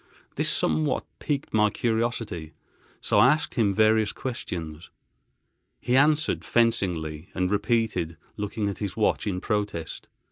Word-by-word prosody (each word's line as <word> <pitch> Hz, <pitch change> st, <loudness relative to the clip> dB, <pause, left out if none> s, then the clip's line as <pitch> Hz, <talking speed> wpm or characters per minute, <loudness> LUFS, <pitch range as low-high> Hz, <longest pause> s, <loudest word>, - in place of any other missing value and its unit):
This -, -, +1 dB
somewhat 80 Hz, 0 st, +1 dB
piqued 140 Hz, -2 st, -3 dB
my 105 Hz, -1 st, +4 dB
curiosity, 110 Hz, -8 st, -2 dB, 0.5 s
so -, -, +2 dB
I -, -, +7 dB
asked 155 Hz, -, -3 dB
him 110 Hz, -5 st, +2 dB
various 110 Hz, -1 st, +4 dB
questions. 85 Hz, -10 st, -6 dB, 0.9 s
He 125 Hz, -, 0 dB
answered 150 Hz, +3 st, +3 dB
fencingly, 90 Hz, -9 st, 0 dB
and 90 Hz, 0 st, 0 dB
repeatedly 105 Hz, -6 st, 0 dB, 0.2 s
looked 105 Hz, +1 st, -5 dB
at 100 Hz, -2 st, -1 dB
his 100 Hz, 0 st, -4 dB
watch 110 Hz, 0 st, +1 dB
in 95 Hz, -3 st, -1 dB
protest. 105 Hz, -7 st, -3 dB
105 Hz, 130 wpm, -26 LUFS, 90-115 Hz, 0.9 s, I